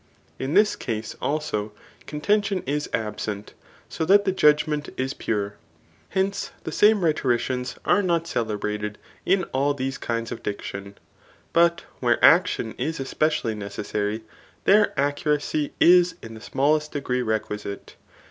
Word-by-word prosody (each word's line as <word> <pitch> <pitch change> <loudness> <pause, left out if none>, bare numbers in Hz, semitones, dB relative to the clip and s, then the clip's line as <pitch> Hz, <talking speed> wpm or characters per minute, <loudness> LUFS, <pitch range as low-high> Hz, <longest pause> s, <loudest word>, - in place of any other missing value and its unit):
In 135 +5 -2
this 210 +1 +5
case, 110 -2 -4
also, 110 -9 -2 0.3
contention 200 +5 0
is 145 +2 -2
absent; 105 -1 -4 0.3
so - - -3
that 200 +4 +5
the 190 - +2
judg 150 -5 +4
ment 150 -1 -2
is 130 +1 -1
pure. 105 -1 -3 0.5
Hence, 195 +1 -1
the - - -4
same 210 -3 +4
rhetoricians 125 -4 0
are 205 - +4
not 170 -3 +1
celebrated 105 -5 -2 0.3
in 190 0 +3
all 140 +2 +1
these 135 0 -3
kinds 115 0 -3
of - - -5
diction; 100 -1 -6 0.6
but 170 0 +4 0.2
where 120 -2 +2
action 165 -9 +4
is 160 -1 -2
especially 135 -3 0
necessary, 105 +1 -3 0.4
there 205 +1 +5
accuracy 145 +1 0
is 180 0 +6
in 115 - -8
the 110 - -11
smallest 150 +5 +1
degree 125 -3 -1
requisite. 110 -3 -4
140 Hz, 135 wpm, -24 LUFS, 110-165 Hz, 0.6 s, is